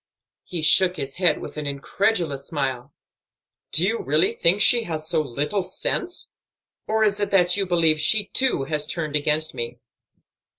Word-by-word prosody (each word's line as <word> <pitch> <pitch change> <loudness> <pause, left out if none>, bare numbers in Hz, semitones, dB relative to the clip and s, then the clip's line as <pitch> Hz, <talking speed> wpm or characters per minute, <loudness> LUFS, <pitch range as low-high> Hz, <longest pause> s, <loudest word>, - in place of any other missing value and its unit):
He 170 -3 -4
shook 180 +3 +4
his 135 -2 -6
head 180 -1 +3
with - - -9
an 150 -1 -4
incredulous 145 0 -2
smile. 135 -4 -3 0.8
"Do 165 +4 +2
you 225 +3 -1
really 150 +4 +1
think 175 +4 +2
she 235 +2 +5
has 155 -2 -4
so 160 -1 +1
little 150 +8 -2
sense? 350 - -3 0.5
Or 220 0 +1
is 205 -1 +1
it 205 - -1
that 180 -2 +3
you 200 -2 -1
believe 165 -3 +2
she 205 +7 +3
too 260 - 0
has 150 +1 -2
turned 155 -2 -3
against 150 +1 0
me?" 120 +1 -5
160 Hz, 165 wpm, -23 LUFS, 145-195 Hz, 0.8 s, she